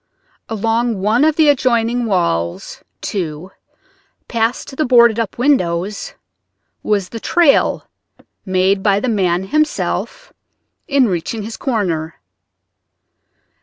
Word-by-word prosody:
Along 225 0 -1
one 215 +7 +2
of 310 -1 +3
the 315 -1 +4
adjoining 245 -3 +2
walls, 85 - -2 0.2
too, 175 -2 -4 0.8
past 235 +3 -2
the 310 - 0
boarded 235 -4 +5
up 225 -3 -3
windows 200 -7 0 0.7
was 200 -3 -1
the 230 - -7
trail 325 +3 +2 0.6
made 190 +1 +1
by 200 0 +2
the 255 - -3
man 185 -5 +1
himself 310 - -2 0.5
in 275 -3 +3
reaching 195 +4 -3
his 225 +2 -6
corner. 175 - -2
220 Hz, 105 wpm, -17 LUFS, 185-245 Hz, 0.8 s, boarded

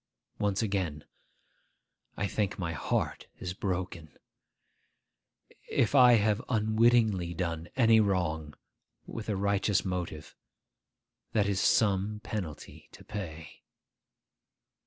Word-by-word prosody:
Once 100 0 0
again, 95 -8 -2 1.1
I 100 - 0
think 100 +1 -1
my 85 -3 -2
heart 75 - -2
is 90 -1 -5
broken. 90 -4 -4 1.5
If 115 - +1
I 125 -3 +8
have 110 -1 +3
unwittingly 110 -5 +2
done 85 -1 -3
any 115 -3 +5
wrong 85 -7 0 0.5
with 110 -1 -7
a 105 - 0
righteous 100 +1 +1
motive, 90 -5 -4 1.0
that 105 -3 +3
is 100 -1 0
some 105 0 +2
penalty 100 -8 -6
to - - -13
pay. 80 -7 -7
100 Hz, 100 wpm, -30 LUFS, 85-110 Hz, 1.5 s, I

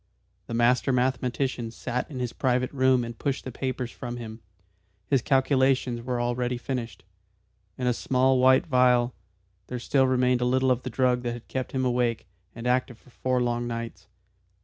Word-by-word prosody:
The 115 - -4
master 125 +3 +3
mathematician 125 -1 0
sat 120 +2 -4
in 140 - -7
his 125 -2 -3
private 125 -1 0
room 130 -2 +3
and 115 0 -6
pushed 140 +3 -2
the 130 - -6
papers 125 -1 -3
from 120 -1 -6
him. 110 -1 -8 0.6
His 135 0 +2
calculations 130 -2 +2
were 125 0 -2
already 120 +1 -1
finished. 120 -6 -5 0.7
In 125 - -3
a 125 - +3
small 130 +2 +2
white 130 +1 +5
phial 125 -4 +3 0.5
there 125 - -4
still 130 +3 +2
remained 125 -1 +2
a - - +2
little 130 +1 +2
of 125 0 +1
the 130 - -5
drug 125 0 +1
that 120 -1 -2
had 120 -1 -10
kept 130 -1 -4
him 130 -1 0
awake 120 -2 0 0.3
and 115 +1 -8
active 125 -1 0
for 125 - -22
four 125 0 0
long 120 0 -1
nights. 115 -1 -6
125 Hz, 175 wpm, -26 LUFS, 120-130 Hz, 0.7 s, white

